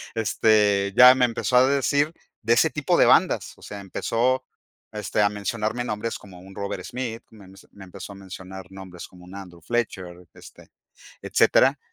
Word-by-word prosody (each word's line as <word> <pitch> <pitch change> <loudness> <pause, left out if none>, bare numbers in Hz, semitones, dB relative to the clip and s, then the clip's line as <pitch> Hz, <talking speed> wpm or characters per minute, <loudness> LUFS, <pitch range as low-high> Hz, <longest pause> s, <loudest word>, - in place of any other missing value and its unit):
Este, 105 -2 +2
ya 125 0 +10
me 125 -1 +3
empezó 125 +1 0
a 130 +1 +5
decir 145 +3 +1 0.3
de 115 +2 +3
ese 160 +7 +3
tipo 150 -2 0
de - - +5
bandas. - - +2
O - - -21
sea, 100 - -8
empezó, 125 +6 -1 0.5
este, 105 0 -2
a 100 - +3
mencionarme 110 +3 -3
nombres 105 +1 -4
como 95 -3 -14
un 95 +1 -14
Robert 100 -2 -5
Smith, 120 -2 -6
me 105 -4 -16
men 95 - -16 0.2
me 95 -2 -13
empezó 95 +2 -10
a - - -13
mencionar 95 -1 -10
nombres 95 -2 -10
como 90 -1 -17
un 95 +2 -12
Andrew 90 -4 -11
Fletcher, 115 -4 -2 0.3
este, - - -16 0.5
etcétera. - - +3
105 Hz, 175 wpm, -23 LUFS, 95-120 Hz, 0.5 s, ya